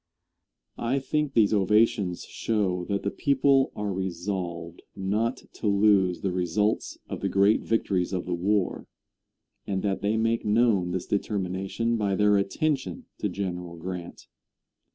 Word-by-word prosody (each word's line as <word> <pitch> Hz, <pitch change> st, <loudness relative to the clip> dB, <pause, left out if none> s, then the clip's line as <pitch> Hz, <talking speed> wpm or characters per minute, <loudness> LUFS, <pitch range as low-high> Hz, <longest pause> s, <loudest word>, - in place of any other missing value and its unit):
I 120 Hz, +4 st, 0 dB
think 145 Hz, +1 st, -1 dB
these 110 Hz, -2 st, +4 dB
ovations 100 Hz, -2 st, +2 dB
show 95 Hz, -5 st, -1 dB
that 100 Hz, +1 st, -2 dB
the 100 Hz, -, -1 dB
people 135 Hz, -1 st, +3 dB
are 105 Hz, -1 st, -2 dB
resolved 85 Hz, -2 st, -4 dB
not 105 Hz, +6 st, -1 dB
to 110 Hz, -, -4 dB
lose 100 Hz, -3 st, +3 dB
the 95 Hz, -, -1 dB
results 90 Hz, +4 st, 0 dB
of -, -, -6 dB
the -, -, 0 dB
great 100 Hz, +2 st, +4 dB
victories 95 Hz, -5 st, 0 dB
of 90 Hz, -2 st, -2 dB
the 90 Hz, -, -2 dB
war, 95 Hz, +3 st, 0 dB, 0.8 s
and 95 Hz, -1 st, -2 dB
that 100 Hz, -2 st, -1 dB
they 105 Hz, +2 st, +1 dB
make 115 Hz, +1 st, +1 dB
known 105 Hz, -4 st, +3 dB
this 90 Hz, 0 st, -3 dB
determination 100 Hz, +3 st, -1 dB
by 100 Hz, -3 st, 0 dB
their 105 Hz, +1 st, +4 dB
attention 150 Hz, -, -1 dB
to 105 Hz, -, -1 dB
General 90 Hz, -2 st, -4 dB
Grant. 90 Hz, +1 st, -7 dB
100 Hz, 140 wpm, -27 LUFS, 90-110 Hz, 0.8 s, these